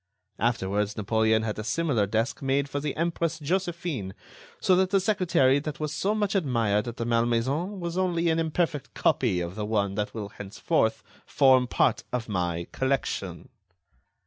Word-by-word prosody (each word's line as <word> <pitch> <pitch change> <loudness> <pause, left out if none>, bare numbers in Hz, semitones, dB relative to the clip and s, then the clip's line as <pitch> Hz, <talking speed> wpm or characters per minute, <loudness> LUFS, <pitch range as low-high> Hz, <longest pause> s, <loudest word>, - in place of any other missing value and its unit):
Afterwards, 105 -2 0
Napoleon 110 +1 +2
had 110 -1 -3
a - - -3
similar 125 -5 0
desk 110 +5 -1
made 135 +1 +1
for 140 0 -3
the 145 0 -3
Empress 165 -1 -1
Josephine; 165 - -2 0.4
so 185 - +4
that 185 0 +2
the 195 - +3
secretary 180 -9 +3
that 150 +1 -6
was 150 -1 -3
so 205 +6 0
much 205 -2 0
admired 115 - +1
at 120 - -6
the 115 - -2
Malmaison 120 - 0
was 170 +1 -3
only 175 -2 +1
an 160 - +1
imperfect 160 -2 -1
copy 100 -9 +1
of 85 0 -4
the 105 +1 -4
one 105 -2 0
that 105 +2 -3
will 105 -3 -5
henceforth 100 0 -1 0.2
form 130 -2 +4
part - - +1
of 125 -2 -2
my 90 -4 -2
collection." 100 - -2
130 Hz, 165 wpm, -27 LUFS, 105-165 Hz, 0.4 s, so